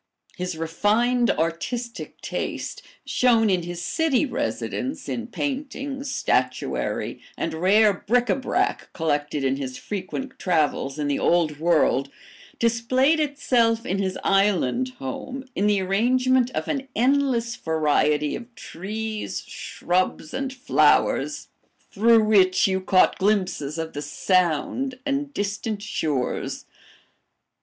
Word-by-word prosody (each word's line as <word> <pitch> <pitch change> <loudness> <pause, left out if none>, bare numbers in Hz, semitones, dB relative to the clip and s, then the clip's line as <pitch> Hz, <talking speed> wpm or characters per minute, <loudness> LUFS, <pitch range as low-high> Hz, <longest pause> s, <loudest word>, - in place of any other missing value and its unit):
His 180 -2 -4
refined, 215 +9 +1
artistic 230 +9 -3
taste, - - -4 0.2
shown 230 -4 +3
in 180 -2 +2
his 175 0 -6
city 315 - +1
residence 255 - -3
in 235 0 -3
paintings, 275 0 -4
statuary, - - -1 0.2
and - - -2
rare 200 +6 +4
bric 240 +6 +1
a - - +2
brac, 265 - -1
collected 150 -3 -1
in 135 0 +1
his 130 -2 -5
frequent 210 +7 -5
travels 155 -5 0
in 150 -1 -1
the 145 - 0
Old 160 -4 +2
World, 155 -5 +2 0.5
displayed 255 +6 +2
itself 240 -6 +1
in 195 +2 -1
his 190 -1 -1
island 195 - +2
home 260 - -6
in 205 - +1
the 205 -1 +3
arrangement 250 +6 +2
of - - -2
an 275 -3 -2
endless 245 -1 +2
variety 150 -3 +1
of 235 +1 -10
trees, 215 +4 -5
shrubs, 175 -3 -2
and 265 0 -2
flowers, 260 +1 +2 0.4
through 225 +1 +5
which 190 -4 +4
you 190 -1 +1
caught 185 0 +3
glimpses 185 -7 0
of 160 0 -4
the 145 - -4
Sound 185 - 0
and 280 0 -1
distant 205 -1 -3
shores. 150 -10 -2
205 Hz, 120 wpm, -24 LUFS, 165-250 Hz, 0.5 s, through